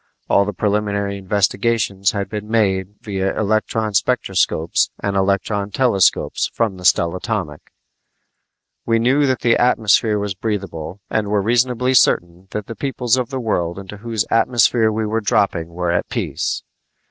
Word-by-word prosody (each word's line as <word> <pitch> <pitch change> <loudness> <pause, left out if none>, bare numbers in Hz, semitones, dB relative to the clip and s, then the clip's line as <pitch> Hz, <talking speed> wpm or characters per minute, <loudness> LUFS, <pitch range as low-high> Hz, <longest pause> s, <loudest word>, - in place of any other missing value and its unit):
All 100 - +3
the 105 - -2
preliminary 100 0 -1
investigations 100 0 +1
had 100 -2 -2
been 105 +1 -6
made 100 -3 0
via 95 -2 -2
electronspectroscopes 110 -6 0
and 100 -1 -2
electrontelescopes 100 +2 +1
from 110 -5 -1
the 90 - -9
stellatomic. 90 -2 0 1.1
We 115 -1 +1
knew 135 +5 +2
that 130 -2 0
the 115 0 +3
atmosphere 110 -3 +3
was 100 -1 -2
breathable 95 -3 -5
and 110 -2 0
were 105 0 +1
reasonably 125 +3 +1
certain 85 -6 +2
that 105 0 -5
the 115 - -8
peoples 125 -3 0
of 125 -1 -2
the 135 -2 -4
world 90 -7 -1
into 100 +1 -9
whose 115 0 -2
atmosphere 115 -1 +3
we 110 +1 -1
were 110 +1 -1
dropping 95 -5 +1
were 85 +1 -2
at 85 - -1
peace. - - -2
105 Hz, 140 wpm, -19 LUFS, 95-115 Hz, 1.1 s, All